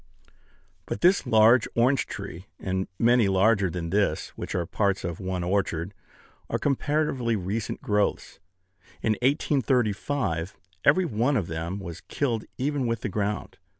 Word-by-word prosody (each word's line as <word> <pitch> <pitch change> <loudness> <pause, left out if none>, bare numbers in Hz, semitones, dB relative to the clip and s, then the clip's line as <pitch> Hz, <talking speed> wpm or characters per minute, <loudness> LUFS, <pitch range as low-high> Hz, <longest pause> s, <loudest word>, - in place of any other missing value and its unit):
But - - -4
this 185 +3 +4
large 110 +2 +5
orange 125 +3 +3
tree, 90 +4 -7
and 95 0 -2
many 120 -2 +4
larger 100 +1 +3
than 85 -1 -4
this, 100 -5 +1
which - - -6
are 85 - 0
parts 100 +2 0
of 85 -1 -4
one 95 -2 -3
orchard, 95 -1 -1 0.6
are - - 0
comparatively 140 -4 0
recent 100 +3 -3
growths. 105 -1 0 0.6
In 110 - +2
1835, 125 - 0 0.3
every 180 +6 +4
one 125 +1 +1
of 100 - 0
them 80 +3 -4
was 85 -4 -7
killed 120 -6 -2
even 135 -1 -1
with 115 -1 -1
the - - -2
ground. 105 +1 -3
105 Hz, 140 wpm, -26 LUFS, 95-125 Hz, 0.6 s, large